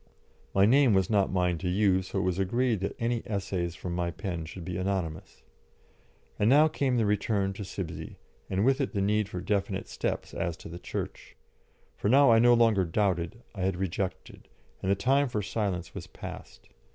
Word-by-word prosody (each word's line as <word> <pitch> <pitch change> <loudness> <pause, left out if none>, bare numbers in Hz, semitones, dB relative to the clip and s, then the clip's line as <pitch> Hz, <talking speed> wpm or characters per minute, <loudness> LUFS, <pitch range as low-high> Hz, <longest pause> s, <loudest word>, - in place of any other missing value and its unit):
My 95 0 +6
name 130 -1 +5
was 95 +2 +2
not 100 -2 +2
mine 90 -2 +1
to 90 - -2
use, 95 -1 +2
so - - -4
it 95 - +1
was 90 0 0
agreed 120 +3 +1
that 95 - -3
any 115 0 -1
essays 95 -4 -2
from 85 +2 -5
my 85 0 -1
pen 90 -2 -4
should 85 +2 -9
be 90 - -4
anonymous. 90 -4 -3 1.0
And 105 - +3
now 150 +4 +6
came 135 -5 0
the 115 - +2
return 100 -1 0
to 100 - -6
Sibsey, 90 -3 -6 0.3
and 95 +3 +1
with 135 +2 +3
it 130 - -2
the 100 - -1
need 105 +1 +1
for 90 - -5
definite 100 +1 -1
steps - - -3
as 85 -1 -2
to - - -10
the 85 +1 -8
Church. - - -6 0.6
For 100 - 0
now 135 +1 +6
I 115 - +6
no 120 +1 +6
longer 115 -5 +4
doubted, 90 +3 -1
I 100 - -6
had 95 0 +1
rejected, 95 0 -4 0.3
and 95 - -2
the 100 - +4
time 135 +6 +2
for 105 -3 -2
silence 95 -5 -2
was - - -7
past. - - -10
100 Hz, 195 wpm, -28 LUFS, 90-115 Hz, 1.0 s, My